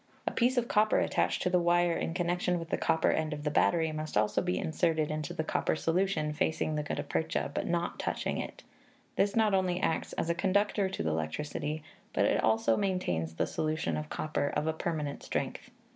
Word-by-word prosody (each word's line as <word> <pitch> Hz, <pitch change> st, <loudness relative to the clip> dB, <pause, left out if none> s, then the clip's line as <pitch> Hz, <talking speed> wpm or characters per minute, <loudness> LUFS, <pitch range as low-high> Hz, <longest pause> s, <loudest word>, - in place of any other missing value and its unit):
A -, -, 0 dB
piece 250 Hz, +2 st, +2 dB
of 240 Hz, -1 st, +2 dB
copper 215 Hz, -1 st, +3 dB
attached -, -, +1 dB
to 180 Hz, -, +1 dB
the 180 Hz, -, +4 dB
wire 175 Hz, 0 st, +3 dB
in 165 Hz, -, -2 dB
connection 175 Hz, 0 st, 0 dB
with 165 Hz, -1 st, -6 dB
the -, -, +2 dB
copper 160 Hz, -, +2 dB
end 155 Hz, -1 st, 0 dB
of 145 Hz, 0 st, -6 dB
the 150 Hz, -, 0 dB
battery 160 Hz, +1 st, +3 dB
must 155 Hz, -5 st, -3 dB
also 105 Hz, 0 st, +2 dB
be 180 Hz, 0 st, -1 dB
inserted 160 Hz, -1 st, 0 dB
into 155 Hz, -1 st, -3 dB
the 160 Hz, -, -2 dB
copper 155 Hz, -, 0 dB
solution 165 Hz, -2 st, 0 dB
facing 155 Hz, 0 st, 0 dB
ihe -, -, -2 dB
gutta 150 Hz, -, -3 dB
percha, 160 Hz, -, -1 dB
but -, -, -2 dB
not 175 Hz, 0 st, -1 dB
touching -, -, -2 dB
it; -, -, -6 dB, 0.5 s
this 200 Hz, 0 st, +2 dB
not 220 Hz, -2 st, +3 dB
only 185 Hz, -2 st, +2 dB
acts 160 Hz, -, -1 dB
as -, -, -2 dB
a 170 Hz, -, +2 dB
conductor 195 Hz, +2 st, +1 dB
to 85 Hz, -, -3 dB
the 80 Hz, -, 0 dB
electricity, 145 Hz, -, -3 dB, 0.3 s
but -, -, +2 dB
also 110 Hz, 0 st, +3 dB
maintains 85 Hz, -, -1 dB
the -, -, +1 dB
solution 155 Hz, -, -1 dB
of 75 Hz, 0 st, -4 dB
copper 155 Hz, -2 st, -1 dB
of 150 Hz, -, 0 dB
a 160 Hz, -, +1 dB
permanent 155 Hz, -3 st, -3 dB
strength. -, -, -3 dB
160 Hz, 205 wpm, -31 LUFS, 150-180 Hz, 0.5 s, the